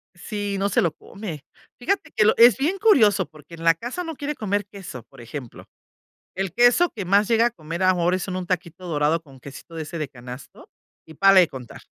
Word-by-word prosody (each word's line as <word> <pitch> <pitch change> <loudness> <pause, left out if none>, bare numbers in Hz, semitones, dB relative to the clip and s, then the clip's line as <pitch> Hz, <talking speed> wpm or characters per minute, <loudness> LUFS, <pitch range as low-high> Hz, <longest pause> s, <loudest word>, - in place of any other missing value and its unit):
Si, 205 +1 -4
no 195 +1 +1
se 200 - +2
lo 170 - +1
come. 160 -2 -9 0.3
Fíjate 300 +4 -1
que 215 -2 +3
lo 215 - +5
es 235 -3 +7
bien 330 +8 -1
curioso 250 - +4
porque 155 +1 -16
en 165 0 -9
la 165 0 +6
casa 245 - -5
no 325 -1 -5
quiere 290 +1 -4
comer 205 -1 -1
queso, 190 - -9
por - - -18
ejemplo. 120 +1 -9 0.7
El 190 -2 -3
queso 245 - +4
que 205 - -6
más 200 +3 +3
llega 230 0 +4
a - - +1
comer 165 -2 -6
ahora 180 -1 +3
es 185 - -4
en 185 -2 -4
un 185 - -4
taquito 180 0 -4
dorado 155 +1 +1
con 135 -4 -17
quesito 140 +5 -12
de 160 - -3
ese 160 +2 -7
de 155 - -3
canasto 125 0 -12 0.4
y 160 - -13
párale 195 +3 +6
de 170 - +1
contar. 125 -3 -10
185 Hz, 220 wpm, -23 LUFS, 155-215 Hz, 0.7 s, es